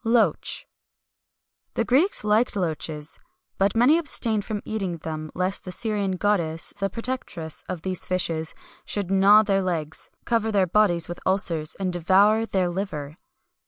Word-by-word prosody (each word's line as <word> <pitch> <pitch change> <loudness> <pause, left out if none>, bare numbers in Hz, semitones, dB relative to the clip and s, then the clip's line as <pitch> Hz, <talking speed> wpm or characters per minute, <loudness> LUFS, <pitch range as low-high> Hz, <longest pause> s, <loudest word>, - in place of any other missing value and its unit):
[XXI - - -44
204] 235 - +5
LOACH. - - -2 1.1
The - - 0
Greeks 295 - +3
liked 215 +3 +2
loaches,[XXI 155 -4 -3
205] - - -31 0.3
but 195 +2 +2
many 275 +8 +5
abstained 225 -9 +1
from 210 -1 -4
eating 195 -6 -3
them, 155 -1 -6
lest 185 +2 -1
the 180 - -7
Syrian 205 -2 -1
goddess, 175 -5 -1
the 195 0 0
protectress 220 -8 -4
of 175 -2 -5
these 185 -1 -1
fishes, 165 -3 -1 0.3
should 200 -3 -2
gnaw 200 +2 +6
their 195 -2 +1
legs, 160 -4 -4 0.2
cover 225 -2 +1
their 200 -3 +3
bodies 175 -3 +2
with 175 - -7
ulcers, 170 -5 +1
and 185 -2 -3
devour 200 +6 +3
their 185 -4 0
liver. 165 -5 -5
190 Hz, 160 wpm, -24 LUFS, 170-210 Hz, 1.1 s, gnaw